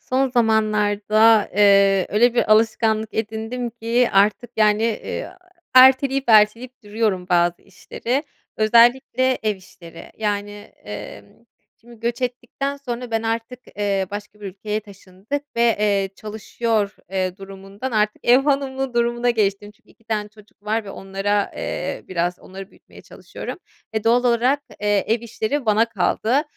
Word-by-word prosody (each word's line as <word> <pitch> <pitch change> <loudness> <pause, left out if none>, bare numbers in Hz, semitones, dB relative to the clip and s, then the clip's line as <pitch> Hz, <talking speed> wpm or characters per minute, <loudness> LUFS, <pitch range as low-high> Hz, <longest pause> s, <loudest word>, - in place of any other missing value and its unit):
Son 265 +1 0
zamanlarda, 215 -1 +3
eee, 200 -2 +5
öyle 235 +4 +3
bir 235 - +3
alışkanlık 220 0 +1
edindim 225 +3 -3
ki 235 +1 0
artık, 210 +4 +2
yani, 215 0 +3
eee, 225 -2 -3 0.4
erteleyip 265 +1 +6
erteleyip 230 +4 +3
duruyorum 205 -3 -1
bazı 175 -1 +1
işleri, 235 +7 -4 0.3
özellikle 240 +3 +3
ev 215 -2 0
işleri. 170 -3 -14
Yani, 205 -1 -2 0.3
emm, 105 0 -8 0.5
şimdi 235 0 -17
göç 235 +2 -3
ettikten 250 +3 -3
sonra 245 -3 -6
ben 225 0 -1
artık, 230 +2 -3 0.2
eee, 200 -2 0
başka 205 +1 -8
bir 205 - -7
ülkeye 210 +3 -4
taşındık 200 +6 -7
ve, 235 -1 +3
eee, 200 -2 +1
çalışıyor, 215 0 -2
eee, 185 -1 -2
durumundan 195 +5 -8
artık 210 -1 0
ev 245 +1 +7
hanımı 270 -2 -1
durumuna 240 +1 +1
geçtim. 205 -2 -1
Çünkü 210 - -28
2 225 - -26
tane 215 -2 -3
çocuk 210 -2 -21
var 215 +1 -1
ve 200 - -8
onlara, 195 +1 -2
eee, - - -4
biraz 175 0 -2
onları 195 +1 -11
büyütmeye - - -18
çalışıyorum. - - -9 0.3
E, 220 -1 -3
doğal 240 +2 +3
olarak, 245 +4 +2 0.2
eee, 205 -1 +1
ev 225 +1 +1
işleri 235 +3 -3
bana 215 +1 +4
kaldı. 225 +6 0
220 Hz, 140 wpm, -21 LUFS, 205-240 Hz, 0.5 s, ev